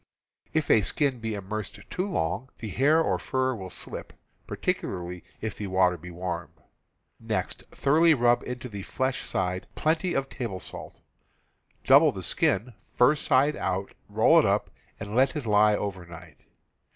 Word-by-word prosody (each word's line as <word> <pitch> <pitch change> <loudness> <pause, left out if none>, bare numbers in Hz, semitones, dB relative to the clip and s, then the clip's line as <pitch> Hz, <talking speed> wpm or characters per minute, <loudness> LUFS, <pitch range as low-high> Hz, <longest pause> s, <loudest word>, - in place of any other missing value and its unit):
If 155 -2 0
a 110 - +6
skin 135 +5 +1
be 110 -1 -3
immersed 105 +1 -5
too 185 +3 -2
long, 125 - -2
the 110 - -6
hair 150 - +3
or - - 0
fur 130 0 0
will 95 -5 -7
slip - - -7 0.2
— - - -40
particularly 90 -1 -3 0.2
if 110 - -4
the 105 - -4
water 95 -1 +3
be 90 +1 -10
warm. 85 -2 -4 0.7
Next - - -3
thoroughly 160 +3 +4
rub 120 -1 +3
into 125 0 -6
the 100 -4 -7
flesh 130 +6 -2
side 90 0 -2
plenty 165 +3 0
of 135 0 0
table 115 -9 -5
salt. - - -8 0.8
Double - - +7
the - - -6
skin, 120 +2 +1 0.2
fur 125 +4 +5
side 145 +1 +2
out, 95 +1 -3 0.2
roll - - +5
it - - +3
up, - - 0 0.3
and 100 +1 -6
let 130 +4 +3
it 150 -5 -3
lie 105 0 +4
over 100 -3 -4
night. 85 -2 -13
110 Hz, 165 wpm, -27 LUFS, 95-135 Hz, 0.8 s, Double